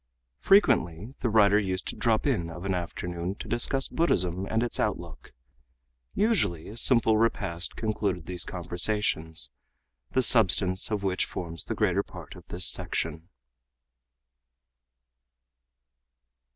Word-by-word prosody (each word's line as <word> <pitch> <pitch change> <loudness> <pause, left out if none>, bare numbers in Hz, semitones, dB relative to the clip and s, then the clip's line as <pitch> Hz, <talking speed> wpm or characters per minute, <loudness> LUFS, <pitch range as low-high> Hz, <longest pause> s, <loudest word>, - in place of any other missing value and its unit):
Frequently 120 - +2
the 120 - -1
writer 105 -1 +4
used 95 -2 -3
to - - -4
drop 115 -3 0
in 100 - -1
of 85 +3 -9
an 95 - -1
afternoon 90 +1 -5
to - - -9
discuss 135 +3 +2
Buddhism 95 - 0
and 110 +3 -1
its 120 - +2
outlook. - - -4 0.8
Usually 180 - 0
a 110 - -10
simple 115 -3 +3
repast 95 -6 -1
concluded 100 -6 -3
these 90 -2 -3
conversations, 85 -4 -1 0.6
the 130 - +1
substance 95 -5 +5
of 105 -2 -3
which 95 -1 0
forms 85 -2 -5
the - - -4
greater - - +1
part - - -12
of - - -15
this 90 0 +1
section. 80 +2 -2
95 Hz, 125 wpm, -26 LUFS, 85-115 Hz, 0.8 s, substance